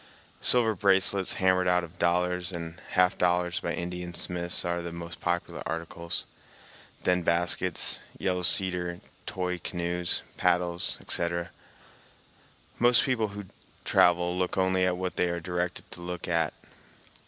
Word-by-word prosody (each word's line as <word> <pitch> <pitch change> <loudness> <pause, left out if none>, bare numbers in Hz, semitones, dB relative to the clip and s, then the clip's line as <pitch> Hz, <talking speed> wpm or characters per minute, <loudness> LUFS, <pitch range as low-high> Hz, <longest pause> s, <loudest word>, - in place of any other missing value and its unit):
Silver 115 -3 +6
bracelets 95 -1 +2
hammered 95 -1 +2
out 90 0 +3
of 85 +1 -11
dollars 90 +1 +1
and 85 0 -6
half 90 0 +3
dollars 90 0 +1
by 85 - -3
Indian 90 0 -5
smiths 85 0 +1
are 85 0 -1
the 85 0 -6
most 85 0 -8
popular 90 0 -2
articles, 85 +1 -4 0.8
then 90 0 +2
baskets, 85 +1 +2 0.2
yellow 90 -1 -1
cedar 90 -1 0 0.3
toy 90 -1 -2
canoes, 85 0 -2
paddles, 85 0 +1
etc. 85 0 0 1.3
Most 120 -1 +5
people 120 -5 +1
who 100 0 -8 0.4
travel 90 0 +3
look 90 0 -1
only 95 0 +2
at 90 -1 0
what 90 0 -4
they 90 - +2
are 85 0 -2
directed 90 +1 -4
to 85 - -7
look 90 0 -5
at. 85 -2 0
90 Hz, 135 wpm, -28 LUFS, 85-90 Hz, 1.3 s, Silver